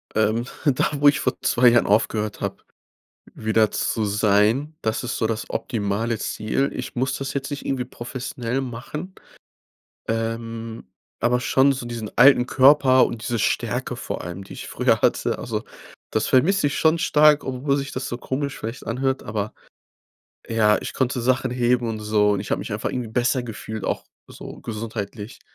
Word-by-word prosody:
Ähm, 110 +2 +1 0.2
da, 140 -3 +3 0.2
wo 145 - +8
ich 140 - +1
vor - - 0
2 125 +1 +4
Jahren 120 0 +5
aufgehört 105 0 +1
hab, - - -4 0.7
wieder 110 -1 +2
zu 110 - -1
sein, 105 +8 +2
das 110 +2 -1
ist 120 - -2
so 115 - 0
das 110 0 -2
optimale 110 0 -1
Ziel. 110 +7 -1
Ich 125 - -6
muss 130 +2 0
das 135 +1 -4
jetzt 140 +1 -3
nicht 145 - -6
irgendwie 130 -2 -1
professionell 125 0 -4
machen, 135 +8 -6 0.9
ähm, 115 - -4 0.3
aber 120 +1 +2
schon 135 +2 +3
so 130 -2 -4
diesen 115 -3 -5
alten 125 0 +7
Körper 130 -1 +6
und 115 -2 -5
diese 115 +3 -2
Stärke - - -1
vor - - -5
allem, 90 +3 -6
die - - -11
ich - - -8
früher - - +2
hatte, - - +1
also, - - -4 0.5
das 110 - 0
vermiss 180 +9 +3
ich 145 0 +1
schon 160 +1 +4
stark, 150 -2 +4
obwohl 135 +2 -1
sich 140 0 -4
das 130 - -4
so 120 - -4
komisch 140 +3 -3
vielleicht 115 +4 -7
anhört, 130 +3 -1
aber, 105 0 -4 1.0
ja, 105 -2 +3
ich - - -5
konnte 130 -1 0
Sachen 130 +1 +1
heben 120 -1 +1
und 110 -1 -3
so, 105 -1 +2
und 100 -2 +1
ich 100 - -4
hab - - +1
mich - - -6
einfach 105 - -2
irgendwie 125 -3 -3
besser 125 +3 +1
gefühlt 110 -2 -6
auch - - -2 0.2
so - - -10
gesundheitlich. 110 0 -6
120 Hz, 175 wpm, -23 LUFS, 110-130 Hz, 1.0 s, wo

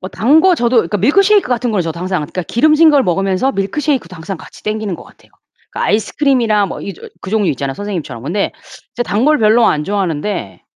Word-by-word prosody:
뭐 185 - -6
단 265 - +3
거 370 +1 +4
저도 240 -4 +2
그니까 210 -2 0
밀크셰이크 395 - +3
같은 245 -1 0
거는 200 -5 0
저도 165 0 -5
항상 185 -1 -1
그니까 180 +5 -5
기름진 310 - +4
걸 285 -2 +4
먹으면서 195 +6 0
밀크셰이크도 220 - -2
항상 180 +3 -6
같이 - - -14
당기는 215 -2 -3
거 - - -12
같아요. - - -21 0.4
그니까 - - -2
아이스크림이나 220 -1 +1
뭐 - - -7
이 200 - -6
저 - - -12
그 185 - -8
종류 210 -3 +1
있잖아요 135 0 -3
선생님처럼. 180 - -6
근데 175 +9 -2 0.4
제가 240 -1 -2
단 210 +6 +1
걸 305 +1 +3
별로 225 +1 +4
안 150 - +1
좋아하는데 185 - -3
210 Hz, 490 characters per minute, -15 LUFS, 185-255 Hz, 0.4 s, 거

